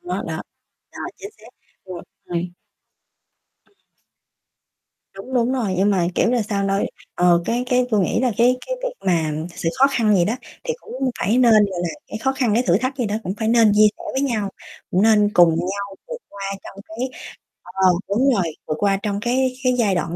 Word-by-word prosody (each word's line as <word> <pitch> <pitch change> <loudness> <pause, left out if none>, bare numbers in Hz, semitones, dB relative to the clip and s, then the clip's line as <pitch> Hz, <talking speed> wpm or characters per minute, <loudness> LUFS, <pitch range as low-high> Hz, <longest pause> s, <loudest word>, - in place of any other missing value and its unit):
Đó, 355 - -3
đó. - - -4 0.5
Rồi, - - -7
chính 405 - -8
xác, - - -16 0.4
rồi, 180 -2 -8 0.2
rồi. 175 0 -3 1.2
Ừm. - - -36 1.4
Đúng, 225 +7 -8
đúng 245 +1 +2
rồi, 220 -8 -1
nhưng 195 +3 +3
mà, 180 -4 +2
kiểu 230 - +2
là 245 -3 +1
sao, 200 -1 -2
nôi 195 0 0 0.3
ờ, 175 -1 +3
cái 240 +2 -1
cái 250 -1 +2
tui 215 -3 +3
nghĩ 190 - +1
là 250 -2 +1
cái 245 +2 +4
cái - - -2
việc - - -3
mà 165 -4 +1 0.2
sự 165 - -2
khó 270 - +7
khăn 225 -6 +2
vậy 175 -3 +4
đó 220 - 0 0.3
thì 475 -1 -1
cũng 260 0 -3
phải 225 +6 +2
nên, 240 -3 +5
gọi 200 -4 +3
là, 175 - -1 0.2
cái 215 - -5
khó 265 +4 0
khăn 250 -6 0
cái 240 - +3
thử 175 +2 +4
thách 255 +3 -2
vậy 240 - 0
đó 205 - -2
cũng 190 0 -3
phải 220 -1 -1
nên 230 -2 +5
chia 215 +1 +6
sẻ - - -10
với 265 - 0
nhau, 220 -7 -1 0.4
cũng 185 +3 +2
nên 210 -2 +4
cùng 175 -1 +7
nhau 195 +4 -3
vượt - - -5
qua 200 0 -10 0.2
trong 195 - -11
cái 235 +4 -4 0.6
ờ, 180 - -12 0.4
đúng 250 +7 +2
rồi 195 -6 +1 0.2
vượt 155 - -1
qua 200 -1 +2
trong 205 -2 -1
cái 255 +3 +1
cái 250 0 +3
giai 205 -5 +2
đoạn 170 -1 -2
215 Hz, 210 wpm, -21 LUFS, 195-250 Hz, 1.4 s, khó